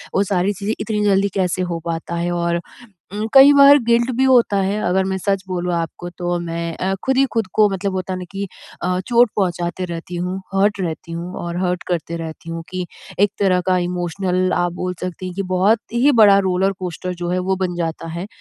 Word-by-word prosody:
वो 195 - +4
सारी 190 +2 +1
चीज़ें 205 +3 -3
इतनी 210 0 -2
जल्दी 200 -1 +3
कैसे 185 -1 0
हो 170 - -2
पाता 170 0 -3
है 170 +1 -1
और 170 0 0 0.6
उम, 210 +2 -2
कई 275 +1 +9
बार 280 0 +8
गिल्ट 235 +2 +3
भी 265 - +3
होता 245 -6 +4
है 200 +2 0
अगर 190 +1 +2
मैं 190 0 -1
सच 195 0 -1
बोलूँ 180 -1 -2
आपको 170 +1 -4
तो 175 0 -1
मैं 170 -1 -4
अ, 190 +1 -1
ख़ुद 265 0 +1
ही 275 - +5
ख़ुद 225 -4 0
को 215 -1 +5
मतलब 195 0 -2
होता 185 0 -3
है 185 - -4
ना 180 - -6
कि 195 0 -4 0.4
अ, 180 +1 0
चोट 240 -2 +4
पहुँचाती 180 -2 -1
रहती 170 0 -6
हूँ 180 +2 -3 0.2
हर्ट 200 +1 +2
रहती 165 -1 -4
हूँ 170 +2 -5
और 170 0 -4
हर्ट 180 0 -1
करती 170 -1 -2
रहती 165 0 -8
हूँ 165 0 -5
कि 185 -1 -3 0.3
एक 205 0 +4
तरह 185 -2 +3
का 185 - +3
इमोशनल 180 +1 -1
आप 175 - 0
बोल 180 0 -2
सकती 185 0 -5
हैं 180 - -6
ये 195 - -1
बहुत 200 +5 +3
ही 260 +5 +4
बड़ा 200 -1 +7
रोलर-कोस्टर 180 -1 -2
जो 175 - -2
है 180 - 0
वो 190 - +3
बन 175 -1 -4
जाता 165 -1 -3
है। 185 - -5
185 Hz, 220 wpm, -20 LUFS, 175-200 Hz, 0.6 s, कई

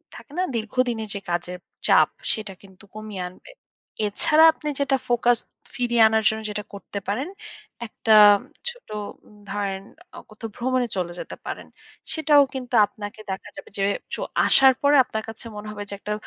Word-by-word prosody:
থাকে - - -13
না? 365 - +2
দীর্ঘদিনের 225 0 -1
যে 200 - -4
কাজের 175 +1 -3 0.3
চাপ। - - +6 0.2
সেটা 215 -3 -6
কিন্তু 190 -1 -17
কমিয়ে 215 -3 -6
আনবে। 185 - -16 0.6
এছাড়া 305 +9 +4
আপনি 300 - -8
যেটা 275 -1 +2
ফোকাস 240 0 +3 0.4
ফিরিয়ে 240 -1 +1
আনার 220 0 +2
জন্য 220 0 -3
যেটা 210 0 -4
করতে 200 0 -6
পারেন, 260 - -2 0.6
একটা 220 0 +1 0.6
ছোট 485 +1 -13 0.6
ধরেন 195 -1 -2 0.4
অ - - -6
কোথাও 220 +1 -8
ভ্রমণে 250 0 0
চলে 175 -1 -2
যেতে - - -7
পারেন। - - -6 0.5
সেটাও 310 -2 +5
কিন্তু 255 -2 -6
আপনাকে 205 +1 -9
দেখা 190 - -6
যাবে 290 - -10
যে - - +1 0.3
চ - - -8 0.3
আসার 265 -1 +7
পরে 285 +1 +4
আপনার 220 -3 -4
কাছে 225 +1 -9
মনে 210 +1 -7
হবে 205 -1 -6
যে, - - -5
একটা 210 - -3
220 Hz, 160 wpm, -24 LUFS, 205-255 Hz, 0.6 s, আসার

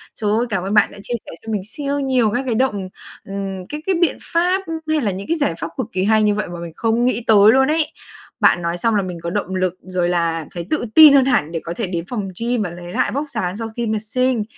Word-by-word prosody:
Trời 210 -2 -1
ơi, 225 +3 +2
cảm 195 -4 -1
ơn 195 +2 -2
bạn 210 - +4
đã - - -13
chia 245 - -5
sẻ - - -9
cho 225 - -4
mình 210 -3 -1
siêu 285 +4 -3
nhiều 255 -5 +2
các 250 - 0
cái 240 -3 0
động 210 -6 0 0.4
ừm, 195 -1 -5
các 300 +1 -5
cái 385 - +1
biện 345 - +2
pháp 360 +3 +1 0.3
h - - -1
hay 310 -1 +2
là 210 -5 0
những 190 +2 -6
cái 335 - 0
giải 285 - 0
pháp 165 - -3
cực 255 - -2
kỳ 185 0 -1
hay 215 +1 +3
như 210 -1 +3
vậy 210 +1 -2
mà 175 -1 -7
mình 170 -1 -7
không 230 +1 +1
nghĩ 245 -1 0
tới 210 -1 +7
luôn 265 +2 +4
ấy! 310 0 +1 0.5
Bạn 175 - +4
nói 170 0 -2
xong 225 +5 +1
là 205 - +3
mình 180 -2 -5
có 170 - -2
động 190 0 -2
lực 185 -1 -1
rồi 180 -1 -1
là 165 -2 0
thấy 170 -1 -6
tự 310 - 0
tin 310 -3 +10
hơn 270 -2 +6
hẳn 165 - +1
để 165 - -2
có 170 - -4
thể 225 +2 -3
đến 170 -2 -3
phòng 210 -6 -3
gym 235 0 0
và 200 - -2
lấy 175 +1 -9
lại - - +1
vóc 285 +5 -3
dáng 185 -8 -3
sau 225 0 -4
khi 235 -1 -2
mà 215 0 0
sinh. 245 +2 0
215 Hz, 285 wpm, -20 LUFS, 185-255 Hz, 0.5 s, tin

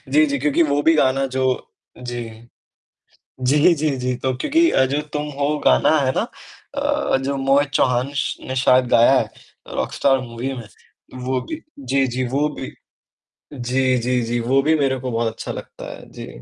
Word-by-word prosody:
जी, 155 - +6
जी, 140 -1 -1
क्योंकि 150 +4 +2
वो 145 -1 +1
भी 165 - +4
गाना 135 -1 +2
जो 130 - +1 0.5
जी। 120 -1 -5 1.2
जी, 130 +4 +2 0.2
जी, 155 0 0
जी, 125 0 0
तो 130 -1 +1
क्योंकि 330 - +3
अ, 130 - +4
जो 140 +3 -1
तुम 150 0 -2
हो 145 +2 +1
गाना 155 - +4
है 130 -2 +1
ना - - +2 0.6
अ, - - +1
जो 140 +1 -2
मोहित 135 +1 +2
चौहान 125 -1 +2
ने 140 - -10
श 140 - -1
ने 130 - -3
शायद 130 -1 +4
गाया 120 +3 +6
है - - +1 0.4
अ, - - -9
रॉकस्टार 135 -1 +1
मूवी 120 +3 -4
में। 120 -4 -8 0.6
वो 130 0 -1
भी, 315 - -7 0.2
जी, 135 0 +1
जी 125 +1 -2
वो 145 +2 +2
भी, 130 - -6 0.8
जी, 130 0 +1
जी, 125 +1 0
जी, 120 +1 -1
वो 130 +4 +2
भी 155 +3 +3
मेरे 135 -2 +1
को 130 - -4
बहुत 115 -1 -1
अच्छा - - -6
लगता - - -9
है। - - -13
जी। - - -9
130 Hz, 190 wpm, -21 LUFS, 125-140 Hz, 1.2 s, जी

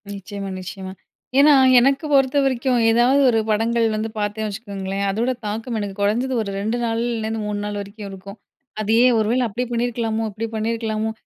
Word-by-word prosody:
நிச்சயமா, 200 0 -6
நிச்சயமா. 190 +1 -7 0.5
ஏன்னா 295 +1 +7 0.3
எனக்கு 275 +5 +2
பொறுத்தவரைக்கும் 265 -2 +2
ஏதாவது 245 +5 +4
ஒரு 225 -2 +2
படங்கள் 230 +2 +1
வந்து 215 +1 -2
பார்த்தேன் 210 +1 -2
வச்சுக்கோங்களேன், 200 -2 -4
அதோட 230 +6 0
தாக்கம் 225 +3 -3
எனக்கு 200 -2 -4
குறைஞ்சது 235 +6 +1
ஒரு 200 - -5
2 220 +4 -1
நாள்லேருந்து 225 -1 -2
3 205 -1 -3
நாள் 205 0 -4
வரைக்கும் 200 +1 -9
இருக்கும். 195 +2 -10 0.4
அதையே 225 +4 +4
ஒரு 215 -1 +1
வேள 255 +2 +2
அப்டி 230 +3 -3
பண்ணியிருக்கலாமோ, 230 -2 -1
இப்டி 215 +3 -4
பண்ணியிருக்கலாமோ. 220 0 -2
220 Hz, 155 wpm, -21 LUFS, 205-240 Hz, 0.5 s, ஏன்னா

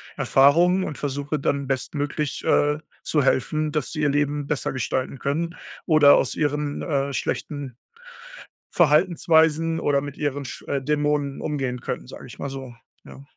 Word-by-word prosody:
Erfahrungen 170 +7 +4
und 150 - -5
versuche 145 +1 -3
dann 140 0 -1
bestmöglich, 145 +2 -2
äh, 150 0 +3 0.2
zu 150 -3 +1
helfen, 155 +4 +1
dass 150 -4 -2
sie 155 - -3
ihr 150 - +3
Leben 145 0 0
besser 150 - -1
gestalten 130 0 -3
können 165 +5 -2 0.3
oder 155 -3 +7
aus - - 0
ihren, 145 -1 -1
äh, 140 -3 -1
schlechten 140 +2 -3 1.0
Verhaltensweisen 165 -1 +3
oder 140 -1 +1
mit 145 -1 -7
ihren 145 -1 -2
Sch - - -8
äh, 140 - -1
Dämonen 145 -1 0
umgehen 135 -5 -2
können, 60 - -5
sage - - -10
ich - - -12
mal 140 - -4
so, 135 -2 -7 0.3
ja. 135 - -12
145 Hz, 155 wpm, -23 LUFS, 140-155 Hz, 1.0 s, oder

